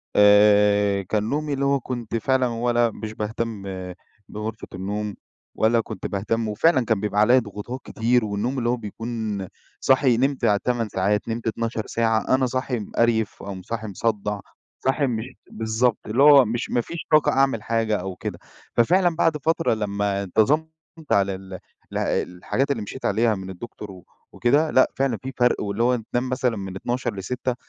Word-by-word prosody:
آآ، 105 -1 +5
كان 105 +3 -1
نومي 150 0 -1
اللي 140 0 -1
هو 140 0 +2
كنت 120 -3 -5
فعلًا 130 +2 +2
ولا 120 0 +1
مش 110 0 -7
باهتم 110 -1 -4 0.7
بغرفة 110 +1 -6
النوم 100 +2 -3 0.4
ولا 115 +1 +3
كنت 110 -3 -8
باهتم 110 +3 -1
وفعلًا 125 +5 +2
كان 110 -2 +1
بيبقى 105 0 0
عليّا 125 +4 +6
ضغوطات 115 +3 -6
كتير 120 +1 +1
والنوم 110 +6 -2
اللي 120 -1 0
هو 125 - +1
بيكون 110 -2 -4 0.3
صاحي 130 -3 +3
نمت 135 -1 +1 0.2
8 120 -3 0
ساعات، 100 +2 0
نمت 115 +1 -3
12 115 0 -2
ساعة، 115 +2 +1
أنا 130 -1 +1
صاحي 130 -1 -2
مِقَرْيِف 110 +1 0
أو 100 - -5
م 95 - -8
صاحي 110 +3 -5
مصدّع، 105 0 -2 0.5
صاحي 135 +1 +2
مش 115 -2 -2 0.3
بالضبط، 110 +1 0
اللي 120 +6 +2
هو 145 -3 +8
مش 115 +3 -3
ما 120 - +1
فيش 170 - -7
طاقة 155 -1 +5
أعمل 135 -5 +2
حاجة 115 -2 0
أو 95 0 -5
كده. - - -6 0.4
ففعلًا 175 +7 +3
بعد 160 -2 +2
فترة 165 -1 +1
لما 100 -2 -1
انتظمت 135 - +2 0.4
على 100 -1 +3
ال 95 0 -11 0.4
ال - - -2
الحاجات 120 +10 -1
اللي - - -1
مشيت 130 +6 -7
عليها 110 +1 +2
من 95 0 -7
الدكتور 105 +1 -8
و 90 -2 -13 0.3
وكده، 145 +6 +2
لأ، 130 - +4
فعلًا 135 -4 +1
في 130 +4 -7
فرق، 125 0 +2
واللي 105 +2 -1
هو 125 +1 +3 0.2
تنام 125 +1 0
مثلًا 125 -3 0
من 95 -1 -6
00:00 120 +3 -2
ل06:00 125 +6 -3
115 Hz, 170 wpm, -23 LUFS, 105-125 Hz, 0.7 s, هو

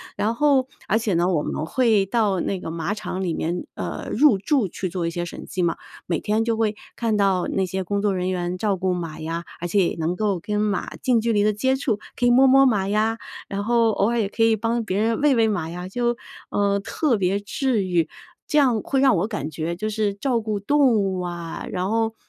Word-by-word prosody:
然 225 +3 0
后 275 -3 +3 0.2
而 220 - +2
且 215 -3 -1
呢， 170 +1 +2
我 165 -5 +1
们 155 - -3
会 220 0 +2
到 205 -3 +1
那 195 - -2
个 160 - -6
马 165 +4 -2
场 190 -3 -4
里 170 -3 -1
面， 175 +3 -2
呃， - - -5
入 265 -5 +5
驻 220 +2 +1
去 185 +2 -4
做 175 -1 -2
一 - - 0
些 175 +1 -3
审 175 - -8
计 185 - -2
嘛， 170 -2 0 0.3
每 170 - -1
天 215 +1 0
就 230 -1 0
会 215 -2 +1 0.2
看 230 -2 0
到 195 -3 +2
那 190 - 0
些 190 +1 -3
工 200 +2 -1
作 200 -2 +1
人 185 0 -1
员 180 0 -2
照 205 0 0
顾 185 0 0
马 165 -3 -5
呀， 165 +2 -4
而 175 - -3
且 185 -1 +2
也 - - -5
能 165 +3 0
够 200 -2 0
跟 210 +4 -2
马 210 -1 -1
近 245 -3 +2
距 230 0 0
离 205 0 +3
的 215 - +3
接 260 +6 +1
触， 255 -6 -1 0.2
可 245 - 0
以 245 - +5
摸 260 +2 +6
摸 270 +1 +6
马 205 -7 +2
呀， 215 +2 +1 0.3
然 200 +1 -3
后 230 +1 +3
偶 205 +1 +1
尔 235 0 0
也 210 - +1
可 225 - 0
以 225 -1 +4
帮 230 +2 -1
别 190 -2 -2
人 225 +1 +1
喂 290 -3 +4
喂 225 -1 +3
马 175 -7 -2
呀， 180 +2 -6
就， 240 +4 0 0.3
呃， 200 0 +1
特 240 +4 0
别 195 +1 +1
治 220 +1 -1
愈， 175 -4 +1 0.4
这 305 - +1
样 245 -6 +3
会 270 - 0
让 265 -3 +5
我 190 - 0
感 165 - -4
觉 165 +2 -3
就 215 +5 -3
是 210 -1 0
照 235 +4 0
顾 215 -2 -2
动 275 +3 +3
物 195 -3 0
啊， 175 -2 -5
然 185 0 -2
后， 225 0 +1
205 Hz, 260 characters per minute, -23 LUFS, 180-230 Hz, 0.4 s, 摸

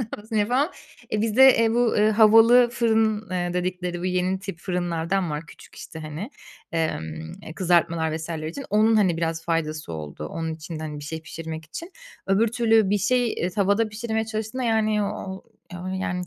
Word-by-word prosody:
kıyaslamasını 220 -1 -4
yapamam. 250 - +2 0.4
Eee, 215 - 0
bizde, 245 +5 +6
eee, 230 -1 +3
bu, 240 0 +2
eee, 210 +1 +4
havalı 225 +3 +6
fırın, 220 -3 +1
eee, 175 -1 -2
dedikleri 180 -1 -2
bu 180 - -5
yeni 185 +1 0
tip 195 -3 -7
fırınlardan 175 0 -1
var 150 +2 -4
küçük, - - -15
işte, 160 - -9
hani. 155 - -6 0.4
Emm, 80 - -3
eee, 160 - -9
kızartmalar 170 -3 +1
vs. 160 +1 -7
için. 160 - -5
Onun, 220 +2 +4
hani, 185 -6 +3
biraz 165 0 -2
faydası 155 - -2
oldu, 75 -1 -6
onun 160 -1 -4
içinde, 160 0 -7
hani, 150 -1 -5
bir 145 - -8
şey 160 +1 -5
pişirmek 160 0 -7
için. 335 - -8 0.4
Öbür 200 +4 +3
türlü 225 -3 +3
bir 205 - +2
şey, 245 +3 +1
eee, 180 - -2
tavada 200 +3 +1
pişirmeye 220 +1 -2
çalıştığında, 220 +3 -4
yani, 215 -2 +2
o 200 -2 -5 0.3
o, 175 +1 -7
yani, 180 -1 -3
190 Hz, 175 wpm, -24 LUFS, 165-220 Hz, 0.4 s, bizde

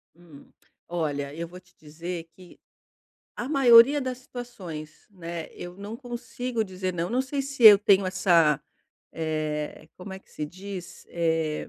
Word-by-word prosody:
Hum, 165 -5 -16 0.4
olha 145 -5 -2
eu 165 +2 -5
vou 180 +2 -11
te 180 -1 -28
dizer 165 +3 -7
que 180 -1 -16 0.8
a 240 - -4
maioria 270 0 +7
das 255 -2 -4
situações, 190 -12 -9
né, 170 -3 -6
eu 175 +1 -9
não 205 +3 -7
consigo 245 -1 -4
dizer 185 -1 -4
"não". 170 0 -2
Não 250 +5 +1
sei 275 +1 -3
se 275 -2 -5
eu 210 -2 +11
tenho 200 -2 +4
essa, 170 -6 +3 0.5
eh, 155 -1 -3
como 190 +1 -9
é 190 - -7
que - - -29
se 150 - -5
diz? 185 +2 -9
Eh, 160 -2 -1
180 Hz, 155 wpm, -26 LUFS, 165-230 Hz, 0.8 s, eu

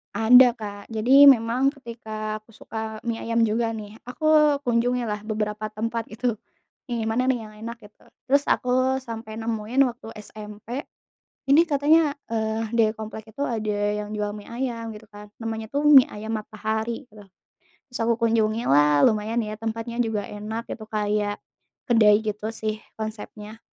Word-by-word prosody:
Ada 240 +3 +7
Kak. 205 -3 -8
Jadi 250 +6 +6
memang 245 0 +5
ketika 220 -4 -6
aku 215 0 -22
suka 220 -1 -6
mie 230 -1 -2
ayam 230 0 +1
juga 225 +1 0
nih, 215 0 -9
aku 300 +2 +3
kunjungi 245 +1 +1
lah 210 -1 -2
beberapa 215 0 -2
tempat 230 +1 -3
itu. 240 +3 -1 0.6
Yang 235 -2 -2
mana 250 +3 +1
nih 260 -2 +2
yang 215 -1 -12
enak 235 +1 -6
gitu, 210 - -18 0.2
terus 280 +2 +3
aku 255 +1 +2
sampai 225 -2 -7
nemuin 225 +3 0
waktu 235 -1 -14 0.2
SMP, 215 +7 -8 0.6
ini 300 +5 +6
katanya, 300 0 +3 0.2
eee, 220 0 -2
dari 220 -2 +4
komplek 220 0 -9
itu 255 - -11
ada 215 -3 -2 0.3
yang 210 - -8
jual 210 0 -3
mie 205 - -10
ayam 235 -2 -4
gitu 215 0 -13
kan, 210 -1 -13
namanya 225 0 -5
tuh 290 +1 +2
Mie 275 -4 +9
Ayam 220 +1 -4
Matahari 220 +4 -4
gitu. 210 -1 -15 0.6
Terus 245 - -7
aku 235 0 +3
kunjungi 225 0 +1
lah 145 +1 +5
lumayan 220 +2 -1
ya 215 -1 -4
tempatnya 225 +1 -5
juga 215 -3 -3
enak 215 +3 -6
gitu, 220 - -10
kayak 210 -1 -1 0.5
kedai 215 -3 +5
gitu 215 0 -4
sih 215 -1 -3 0.2
konsepnya, 215 0 -7
225 Hz, 160 wpm, -24 LUFS, 215-240 Hz, 0.6 s, Mie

